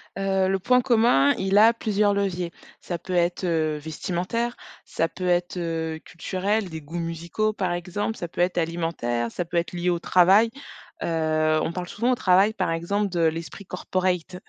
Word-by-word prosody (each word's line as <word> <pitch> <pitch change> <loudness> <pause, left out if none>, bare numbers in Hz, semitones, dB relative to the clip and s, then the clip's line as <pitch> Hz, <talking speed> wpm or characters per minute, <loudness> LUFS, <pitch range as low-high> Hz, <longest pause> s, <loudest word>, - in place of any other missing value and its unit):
Heu, 195 -1 +1
le 195 0 +1
point 250 +5 +3
commun, 225 - +4
il 195 +1 +1
a 225 +2 +7
plusieurs 210 -2 +1
leviers. 180 -4 -1 0.3
Ça 175 - -4
peut 185 +3 -7
être, 175 +1 +1
heu, 160 -3 0
vestimentaire. 180 +10 -3 0.3
Ça 165 - -1
peut 180 +2 -5
être, 175 +1 +1
heu, 160 -2 -3
culturel, 190 +3 -2
des 160 -1 -7
goûts 160 +4 -7
musicaux 170 +6 -2
par 185 -4 -1
exemple, 185 +5 -3
ça 175 - -4
peut 170 - -4
être 180 0 +1
alimentaire, 165 -9 -1
ça 175 - -3
peut 170 +1 -3
être 170 +1 -1
lié 175 0 -1
au 175 -1 +1
travail. 195 +7 +5 0.5
Heu, 155 -1 +1
on 160 - -1
parle 180 0 -4
souvent 235 +7 0
au 250 - +3
travail 195 +1 +4
par 165 - -1
exemple 200 +5 -1
de 175 -2 -3
l'esprit 165 +4 -2
corporate. 180 0 -2
180 Hz, 180 wpm, -24 LUFS, 165-195 Hz, 0.5 s, a